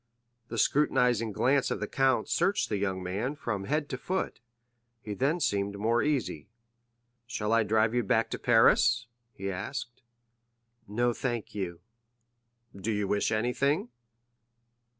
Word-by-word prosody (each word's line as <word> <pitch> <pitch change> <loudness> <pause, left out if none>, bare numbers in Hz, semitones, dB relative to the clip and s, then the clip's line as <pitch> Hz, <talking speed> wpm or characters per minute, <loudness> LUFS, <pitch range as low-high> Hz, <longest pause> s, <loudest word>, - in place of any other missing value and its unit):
The - - -6
scrutinizing 125 -6 +2
glance 130 +6 +2
of - - -2
the - - -2
count 130 -4 +1
searched 195 +4 +1
the 105 - 0
young 95 -2 -2
man 105 +10 -2
from 105 -9 -3
head 150 +3 0
to 130 - -4
foot. 190 +6 -2 0.6
He 105 -2 -6
then 140 - +1
seemed 100 -7 0
more 115 +3 +2
easy. 135 - -1 0.8
"Shall 110 -2 -1
I 115 - +5
drive 110 +1 +2
you 120 - +2
back 110 +1 +1
to - - -3
Paris?" 115 -1 +4 0.3
he 95 0 -3
asked. 120 +6 -5 0.9
"No, 120 +4 +1
thank 120 -3 -3
you." 90 -4 -4 0.9
"Do 100 +3 -3
you 105 -1 -1
wish 100 +3 +1
anything?" 140 - +1
115 Hz, 140 wpm, -29 LUFS, 105-130 Hz, 0.9 s, I